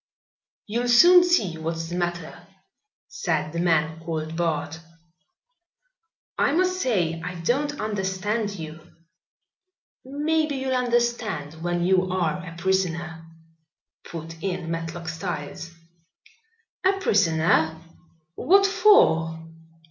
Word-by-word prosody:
"You'll 235 +3 -2
soon 350 +9 +7
see 205 - +1
what's 165 +1 -4
the 175 - -4
matter," 175 0 -4 0.6
said 460 - -2
the 170 - -3
man 160 -2 +1
called 160 -1 -4
Bart. 160 -2 -2 1.6
"I - - +2
must 370 +2 +1
say 170 -9 0
I 180 0 -5
don't 275 - -1
understand 205 +1 -2
you." 160 -1 -8 1.2
"Maybe 300 +2 -1
you'll 265 0 -2
understand 235 - -1
when 175 0 -1
you 185 +1 +2
are 175 -4 0
a 165 -2 -9
prisoner," 170 -3 -2 0.8
put 165 0 -9
in 180 -3 -3
Matlock 165 +1 -5
Styles. 160 0 -5 1.1
"A 380 +1 +4
prisoner? 165 - +2 0.6
What 395 - +4
for?" 165 - +4
180 Hz, 100 wpm, -24 LUFS, 165-245 Hz, 1.6 s, soon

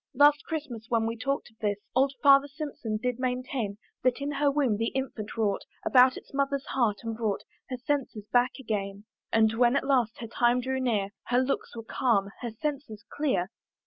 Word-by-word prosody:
Last 290 +2 +6
Christmas 275 -9 -5
when 230 -2 +2
we 230 +1 -1
talked 255 +1 -2
of 220 - -32
this, 205 -2 0 0.2
Old 270 +1 +3
Farmer 275 0 +7
Simpson 280 -7 -4
did 250 +2 -2
maintain, 250 -4 -2 0.2
That 255 +1 +2
in 280 +1 -2
her 290 0 +2
womb 275 -7 +1
the 225 +1 0
infant 235 -5 -4
wrought 205 -3 +1 0.2
About 255 0 +6
its - - -13
mother's 275 0 0
heart, 225 -6 0
and 225 -1 -3
brought 220 -3 -1 0.3
Her 255 - -3
senses 250 -5 -2
back 245 +1 +4
again: 205 -4 -3 0.3
And 220 -1 +4
when 240 +2 +3
at 280 - +1
last 250 -5 +2
her 230 - -6
time 240 +2 +2
drew 265 +1 -2
near, 215 -6 +1 0.2
Her 250 +1 +2
looks 265 -1 -2
were 230 - -6
calm, 210 -4 +1
her 240 - -3
senses 260 -3 -5
clear. 260 -11 0
245 Hz, 190 wpm, -28 LUFS, 220-275 Hz, 0.3 s, Farmer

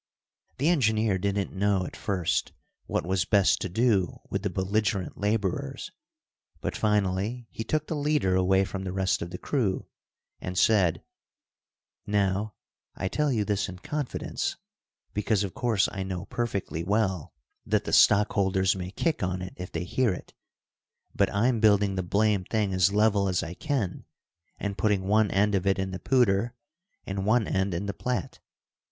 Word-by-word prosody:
The 140 - +1
engineer 110 - +2
didn't 100 0 -1
know 100 -1 +1
at - - -8
first 95 -5 -1 0.3
what - - -1
was 95 0 +1
best 100 +3 +3
to 95 - -2
do 105 -2 +1
with - - -1
the - - -1
belligerent 100 0 -1
laborers, 110 - -1 0.7
but - - -3
finally 105 +3 0
he 115 - -5
took 155 +6 -1
the 160 - -3
leader 145 -10 +1
away 95 +1 +3
from 95 0 -5
the 95 - -3
rest 95 0 0
of 85 - -4
the 90 - -6
crew 110 -8 -1 0.5
and 90 0 -5
said, 95 -7 +3 1.0
"Now, 100 0 0 0.4
I 95 - -2
tell 150 +4 +1
you 110 -5 +1
this 105 -1 0
in 90 - -8
confidence, 145 +8 -3 0.6
because 105 0 +1
of 95 - -4
course 115 -5 +1
I 95 - -4
know 95 -1 -4
perfectly 100 -8 -3
well 95 -4 0 0.3
that - - +1
the - - -4
stockholders 95 -2 +4
may 90 -1 -5
kick 160 - -1
on 90 0 -2
it 90 - -7
if 90 0 -7
they 85 - -3
hear 120 +5 +1
it, 90 - -7 0.8
but - - +2
I'm 115 +3 +2
building 100 -2 +4
the 95 - -1
blamed 100 +1 +1
thing 105 -4 0
as 95 +2 +3
level 105 -1 +3
as 90 - 0
I 80 - -5
can 130 - -2 0.5
and 100 -2 -4
putting 100 0 +2
one 105 +2 +3
end 105 +1 +2
of 95 0 0
it 95 - +3
in 95 0 -2
the 95 - -5
Poudre 120 -3 +2 0.5
and 95 0 -3
one 110 +1 +2
end 95 -1 0
in 90 +4 -3
the 100 - -3
Platte. 125 +4 -3
100 Hz, 170 wpm, -27 LUFS, 95-110 Hz, 1.0 s, stockholders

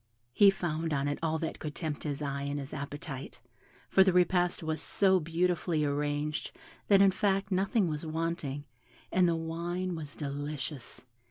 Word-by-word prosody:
He 200 +7 +7
found 165 -4 -1
on 140 0 0
it 145 - -2
all 160 -1 0
that 160 0 -4
could 150 -2 -5
tempt 155 -3 -4
his 145 0 -3
eye 140 -1 -2
and 140 +1 -2
his 140 0 -7
appetite, 145 -1 -6 0.5
for 190 - +6
the 190 - +4
repast 180 -1 +2
was 160 0 -2
so 190 -2 +4
beautifully 170 -1 0
arranged, 145 +1 -1 0.3
that 200 -1 +6
in 195 - +6
fact 195 0 0
nothing 195 +2 +2
was 150 -1 -3
wanting, 160 -3 -3 0.5
and 180 -1 +4
the 165 - +2
wine 170 +3 -3
was 150 -3 -6
delicious. 145 -2 -5
160 Hz, 165 wpm, -30 LUFS, 145-180 Hz, 0.5 s, He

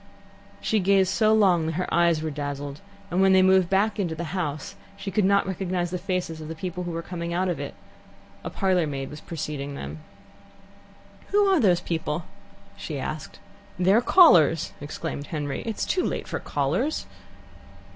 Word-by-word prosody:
She 220 - +1
gazed 190 0 +3
so 215 -1 +3
long 185 -7 +4
that - - 0
her 180 +3 -3
eyes 170 -2 +3
were 160 - -2
dazzled, 145 0 -5 0.3
and 180 +2 +2
when 195 0 +5
they 190 0 +6
moved 190 -2 +4
back 200 +3 +2
to 205 - +1
the 165 -1 -3
house, 155 -6 -3 0.2
she 195 0 -5
could 205 0 +2
not 200 +1 +3
recognize 185 -2 -2
the 180 - -2
faces 180 -3 -3
of 155 +1 -7
people 180 +1 -4
who 175 - -3
were 165 0 -4
coming 170 -1 -4
out 185 +1 +1
of 175 - -2
it. - - -6 0.7
A - - -4
parlour 185 -4 +1
maid 135 -2 -4
was 150 - -9
preceding 150 -3 -5
them. 150 - -7 1.3
"Who 410 0 +3
are 385 -3 +4
those 180 -7 +3
people?" 160 -1 -3 0.5
she - - -6
asked. - - -5 0.4
"They're 190 +5 +4
callers!" 170 - +5
exclaimed 145 0 -5
Henry. 145 -4 -3
"It's 225 - -2
too 365 - 0
late - - -3
for - - -3
callers." 165 - -1
175 Hz, 175 wpm, -25 LUFS, 155-195 Hz, 1.3 s, they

